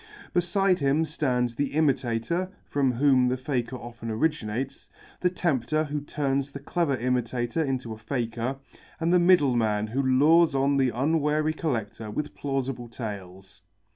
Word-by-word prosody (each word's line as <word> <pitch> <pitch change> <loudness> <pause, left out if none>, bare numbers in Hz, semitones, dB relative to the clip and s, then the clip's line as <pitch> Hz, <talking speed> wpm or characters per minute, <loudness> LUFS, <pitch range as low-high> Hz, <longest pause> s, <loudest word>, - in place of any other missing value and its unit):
Beside 180 +1 +2
him 145 +3 +2
stand 130 -5 0
the 140 +5 -3
Imitator, 145 +3 0
from 135 -3 +1
whom 130 0 +4
the 125 +1 0
faker 130 -2 -2
often 120 -2 -8
originates, 130 0 -2 0.3
the 180 - +2
tempter 155 -4 0
who 150 -1 -3
turns 140 -1 -1
the 140 - -8
clever 145 -1 0
imitator 125 +3 -1
into 130 -5 -2
a 110 - -11
faker, 120 +1 -2 0.4
and 165 +1 +1
the 180 - +6
middleman 125 - +3
who 120 +6 -1
lures 145 +4 +4
on 140 +1 +2
the 130 -2 +3
unwary 150 +4 +1
collector 115 -8 -3
with 150 +8 -4
plausible 135 -3 -3
tales. 95 -6 -8
135 Hz, 140 wpm, -26 LUFS, 120-150 Hz, 0.4 s, the